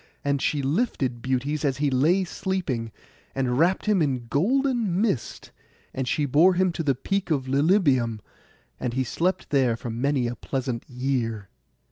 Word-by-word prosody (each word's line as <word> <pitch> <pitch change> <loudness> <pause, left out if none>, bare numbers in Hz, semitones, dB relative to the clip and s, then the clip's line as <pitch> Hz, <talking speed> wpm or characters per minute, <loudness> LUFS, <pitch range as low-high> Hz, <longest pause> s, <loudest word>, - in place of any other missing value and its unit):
And 140 -1 +1
she 145 -1 0
lifted 135 - -1
Butes 130 +4 -1
as 135 -3 0
he 145 -1 +1
lay 160 +9 +3
sleeping, 175 - -3 0.4
and 130 -1 0
wrapt 180 +4 +2
him 210 -4 +2
in 130 -5 0
golden 235 - +1
mist; 200 - -2 0.4
and 130 -1 -3
she 145 +4 +1
bore 160 +7 +4
him 185 0 +2
to 170 - -4
the 140 -4 +1
peak 195 +9 -2
of 140 -5 0
Lilybæum, 135 - +2 0.6
and 125 -2 -3
he 130 - +1
slept 170 - -1
there 130 -5 +2
many 130 +2 0
a 120 0 -2
pleasant 125 -1 -4
year. 125 -5 -2
140 Hz, 155 wpm, -25 LUFS, 125-175 Hz, 0.6 s, bore